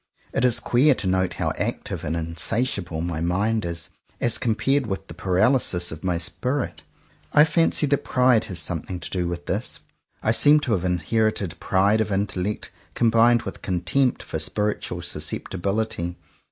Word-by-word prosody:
It -, -, 0 dB
is 125 Hz, -3 st, +4 dB
queer 135 Hz, +4 st, +3 dB
to 100 Hz, -, -4 dB
note 95 Hz, -1 st, +1 dB
how -, -, -1 dB
active 95 Hz, -4 st, -3 dB
and 80 Hz, +1 st, -2 dB
insatiable 85 Hz, +1 st, -1 dB
my 85 Hz, -2 st, -3 dB
mind 100 Hz, +5 st, 0 dB
is, 85 Hz, +1 st, -5 dB, 0.3 s
as 120 Hz, -, +2 dB
compared 130 Hz, +3 st, +1 dB
with 95 Hz, -2 st, -4 dB
the -, -, -9 dB
paralysis 90 Hz, 0 st, +1 dB
of 80 Hz, 0 st, -8 dB
my 90 Hz, -2 st, 0 dB
spirit. 125 Hz, -, -2 dB, 0.5 s
I 150 Hz, -, +7 dB
fancy 165 Hz, -1 st, +2 dB
that 140 Hz, -1 st, +1 dB
pride 125 Hz, -3 st, +3 dB
has 90 Hz, -, -6 dB
something 85 Hz, +2 st, -3 dB
to -, -, -6 dB
do 90 Hz, -2 st, -1 dB
with 85 Hz, 0 st, -5 dB
this. -, -, -2 dB, 0.4 s
I 110 Hz, -, +3 dB
seem 145 Hz, +6 st, +6 dB
to 130 Hz, -, -2 dB
have 95 Hz, -4 st, +1 dB
inherited 100 Hz, +1 st, 0 dB
pride 100 Hz, +4 st, +2 dB
of 110 Hz, -, -2 dB
intellect 100 Hz, 0 st, -2 dB, 0.2 s
combined 115 Hz, 0 st, +4 dB
with -, -, -7 dB
contempt 95 Hz, +9 st, 0 dB
for -, -, -4 dB
spiritual 105 Hz, 0 st, -2 dB
susceptibility. 95 Hz, -2 st, -3 dB
100 Hz, 160 wpm, -24 LUFS, 90-120 Hz, 0.5 s, I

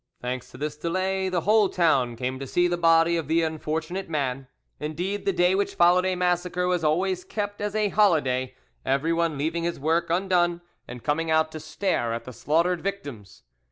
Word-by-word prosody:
Thanks 125 Hz, 0 st, -5 dB
to -, -, -13 dB
this 150 Hz, +2 st, -3 dB
delay, 185 Hz, +4 st, -1 dB
the 180 Hz, -2 st, 0 dB
whole 210 Hz, +1 st, +4 dB
town 135 Hz, -9 st, +2 dB
came 130 Hz, +2 st, -3 dB
to 135 Hz, -, -6 dB
see 175 Hz, +6 st, +2 dB
the 175 Hz, -, 0 dB
body 165 Hz, 0 st, +4 dB
of 160 Hz, -4 st, -3 dB
the 165 Hz, +2 st, +2 dB
unfortunate 160 Hz, +3 st, -3 dB
man. 135 Hz, -4 st, -2 dB, 0.3 s
Indeed, 175 Hz, +7 st, -3 dB
the -, -, +4 dB
day 180 Hz, 0 st, +3 dB
which 200 Hz, +1 st, -1 dB
followed 180 Hz, +2 st, +4 dB
a 185 Hz, -, 0 dB
massacre 180 Hz, 0 st, 0 dB
was 180 Hz, -2 st, 0 dB
always 180 Hz, +4 st, +1 dB
kept 205 Hz, -1 st, -4 dB
as 210 Hz, 0 st, -3 dB
a 210 Hz, -1 st, +1 dB
holiday, 135 Hz, -11 st, +2 dB, 0.3 s
everyone 160 Hz, +3 st, 0 dB
leaving 160 Hz, +4 st, -1 dB
his 170 Hz, -2 st, -2 dB
work 160 Hz, +4 st, 0 dB
undone 175 Hz, -1 st, +1 dB, 0.3 s
and 120 Hz, -1 st, -9 dB
coming 160 Hz, +2 st, 0 dB
out 160 Hz, 0 st, +2 dB
to 155 Hz, -, -7 dB
stare 155 Hz, -6 st, -1 dB
at 115 Hz, -, -6 dB
the 125 Hz, -, -9 dB
slaughtered 170 Hz, +6 st, +1 dB
victims. 145 Hz, -, -6 dB
165 Hz, 190 wpm, -25 LUFS, 150-180 Hz, 0.3 s, whole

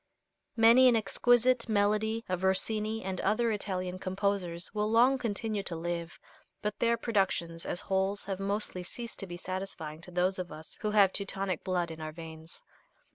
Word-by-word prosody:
Many 235 Hz, +3 st, +7 dB
an 245 Hz, -, +5 dB
exquisite 240 Hz, +3 st, +3 dB
melody 215 Hz, +2 st, +1 dB
of 185 Hz, -1 st, -2 dB
Rossini 215 Hz, +3 st, +1 dB
and 185 Hz, -1 st, -3 dB
other 225 Hz, +3 st, +2 dB
Italian 185 Hz, -3 st, -3 dB
composers 185 Hz, -2 st, -2 dB
will 210 Hz, 0 st, 0 dB
long 245 Hz, +4 st, +4 dB
continue 220 Hz, -2 st, -2 dB
to 180 Hz, -3 st, -4 dB
live, 170 Hz, 0 st, -4 dB, 0.5 s
but 210 Hz, 0 st, -2 dB
their 235 Hz, 0 st, +3 dB
productions 190 Hz, -7 st, 0 dB
as 175 Hz, -, +1 dB
wholes 195 Hz, +1 st, 0 dB
have 195 Hz, -1 st, -4 dB
mostly 200 Hz, -1 st, 0 dB
ceased 235 Hz, +6 st, -7 dB
to 195 Hz, -, -4 dB
be 175 Hz, -1 st, -7 dB
satisfying 180 Hz, -4 st, -5 dB
to 175 Hz, -, -9 dB
those 180 Hz, +2 st, 0 dB
of 180 Hz, -1 st, -5 dB
us 155 Hz, +1 st, -8 dB
who 210 Hz, -, 0 dB
have 205 Hz, -3 st, +5 dB
Teutonic 195 Hz, -3 st, -1 dB
blood 175 Hz, -2 st, -1 dB
in 160 Hz, 0 st, -8 dB
our 155 Hz, 0 st, -4 dB
veins. 160 Hz, 0 st, -10 dB
195 Hz, 170 wpm, -30 LUFS, 180-220 Hz, 0.5 s, Many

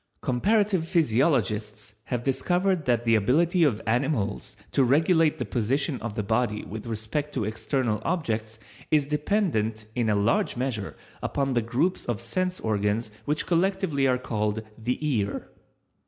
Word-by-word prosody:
Comparative 195 Hz, -, +1 dB
physiologists 110 Hz, -, +1 dB
have 125 Hz, -2 st, -2 dB
discovered 175 Hz, +5 st, +1 dB
that 120 Hz, -1 st, +1 dB
the 115 Hz, -, +4 dB
ability 160 Hz, -, +3 dB
of 125 Hz, -9 st, +2 dB
animals 110 Hz, -4 st, -1 dB
to 140 Hz, -, +3 dB
regulate 160 Hz, +4 st, +3 dB
the 125 Hz, -, -3 dB
position 130 Hz, +6 st, -1 dB
of 115 Hz, -3 st, -5 dB
the 105 Hz, -, -1 dB
body 110 Hz, 0 st, 0 dB
with 110 Hz, +3 st, -7 dB
respect 115 Hz, +7 st, -3 dB
to 110 Hz, -, 0 dB
external 110 Hz, +1 st, -1 dB
objects 115 Hz, -11 st, -2 dB, 0.3 s
is 150 Hz, -2 st, +3 dB
dependent 150 Hz, -, 0 dB
in 120 Hz, -2 st, 0 dB
a 105 Hz, -, +3 dB
large 105 Hz, +4 st, +1 dB
measure 120 Hz, -6 st, -3 dB, 0.3 s
upon 135 Hz, -1 st, -1 dB
the 120 Hz, -, +2 dB
groups 125 Hz, +11 st, 0 dB
of 120 Hz, -4 st, -1 dB
sense 180 Hz, +11 st, -2 dB
organs 105 Hz, +1 st, 0 dB
which 150 Hz, +1 st, 0 dB
collectively 175 Hz, -5 st, +1 dB
are 125 Hz, -1 st, +3 dB
called 110 Hz, -3 st, -2 dB
the 120 Hz, +3 st, -2 dB
ear. 105 Hz, -8 st, -1 dB
125 Hz, 145 wpm, -26 LUFS, 110-150 Hz, 0.3 s, the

